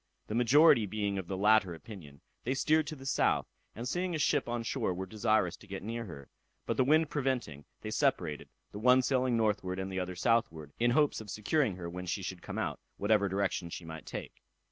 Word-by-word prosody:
The -, -, -6 dB
majority 120 Hz, 0 st, +5 dB
being 100 Hz, -1 st, -2 dB
of 90 Hz, -, -6 dB
the 95 Hz, -, -3 dB
latter 105 Hz, -3 st, +4 dB
opinion, 80 Hz, -7 st, -12 dB, 0.2 s
they 130 Hz, +3 st, -1 dB
steered 155 Hz, +2 st, +2 dB
to 155 Hz, -, -5 dB
the 135 Hz, -2 st, -12 dB
south, 135 Hz, -, +2 dB, 0.3 s
and 120 Hz, +3 st, -5 dB
seeing 180 Hz, +4 st, -1 dB
a -, -, 0 dB
ship 145 Hz, -3 st, +1 dB
on 120 Hz, -1 st, -2 dB
shore 115 Hz, -6 st, -1 dB
were 95 Hz, +1 st, -4 dB
desirous 110 Hz, +2 st, +1 dB
to 105 Hz, -, -17 dB
get 95 Hz, -1 st, -6 dB
near 115 Hz, +2 st, -4 dB
her, 70 Hz, -8 st, -10 dB, 0.4 s
but -, -, -1 dB
the 130 Hz, -, +3 dB
wind 155 Hz, +3 st, +3 dB
preventing, 125 Hz, -, -2 dB, 0.2 s
they -, -, -5 dB
separated, 75 Hz, -1 st, 0 dB, 0.2 s
the 105 Hz, -, -7 dB
one 125 Hz, +3 st, +5 dB
sailing 130 Hz, -2 st, +2 dB
northward 100 Hz, -4 st, 0 dB
and 95 Hz, 0 st, -4 dB
the 95 Hz, -, -2 dB
other 90 Hz, 0 st, -4 dB
southward, 90 Hz, -8 st, 0 dB
in 120 Hz, +1 st, +3 dB
hopes 145 Hz, 0 st, +2 dB
of 105 Hz, -, -10 dB
securing 105 Hz, -, 0 dB
her 90 Hz, -2 st, -6 dB
when 90 Hz, +1 st, -6 dB
she 95 Hz, +2 st, -2 dB
should 90 Hz, -1 st, -5 dB
come -, -, -6 dB
out, -, -, -2 dB, 0.2 s
whatever 100 Hz, -1 st, +2 dB
direction 95 Hz, -2 st, -1 dB
she 85 Hz, -, -7 dB
might 80 Hz, -1 st, -9 dB
take. -, -, -7 dB
110 Hz, 215 wpm, -31 LUFS, 95-125 Hz, 0.4 s, majority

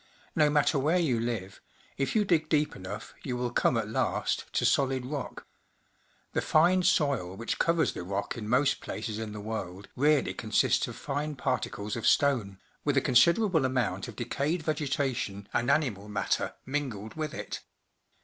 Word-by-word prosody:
No 150 Hz, -1 st, +4 dB
matter 145 Hz, 0 st, +3 dB
where 155 Hz, +6 st, +2 dB
you 140 Hz, -10 st, +1 dB
live, 110 Hz, -5 st, -4 dB, 0.3 s
if 135 Hz, +8 st, -1 dB
you 210 Hz, -1 st, +3 dB
dig 160 Hz, -4 st, +2 dB
deep 150 Hz, -1 st, +2 dB
enough, 100 Hz, +4 st, -7 dB
you 125 Hz, -2 st, -3 dB
will 125 Hz, -1 st, -2 dB
come 120 Hz, -, +2 dB
at 110 Hz, -2 st, -1 dB
last 110 Hz, -, -1 dB
to -, -, +1 dB
solid 130 Hz, -2 st, +2 dB
rock. 140 Hz, 0 st, -5 dB, 0.9 s
The -, -, +1 dB
fine 175 Hz, +4 st, +4 dB
soil 135 Hz, -, +1 dB
which 115 Hz, -, -3 dB
covers 165 Hz, -1 st, +2 dB
the -, -, -5 dB
rock 100 Hz, +3 st, -3 dB
in 110 Hz, -3 st, -6 dB
most 130 Hz, +4 st, +3 dB
places 110 Hz, -2 st, -4 dB
in 110 Hz, -1 st, -4 dB
the 105 Hz, -, -6 dB
world 100 Hz, -3 st, -5 dB
really 145 Hz, +2 st, +3 dB
consists -, -, +1 dB
of -, -, -7 dB
fine 145 Hz, +1 st, -3 dB
particles 110 Hz, -5 st, -2 dB
of 115 Hz, -, -1 dB
stone, 120 Hz, -9 st, +2 dB, 0.3 s
with 145 Hz, -2 st, +1 dB
a -, -, +8 dB
considerable 165 Hz, -, +4 dB
amount 125 Hz, -6 st, 0 dB
of 120 Hz, -, -9 dB
decayed 140 Hz, -, -1 dB
vegetation 135 Hz, -9 st, -2 dB
and 120 Hz, +2 st, +1 dB
animal 125 Hz, -9 st, +1 dB
matter 105 Hz, -1 st, -1 dB
mingled 125 Hz, -7 st, -3 dB
with 155 Hz, -1 st, -4 dB
it. -, -, -5 dB
130 Hz, 170 wpm, -29 LUFS, 110-150 Hz, 0.9 s, a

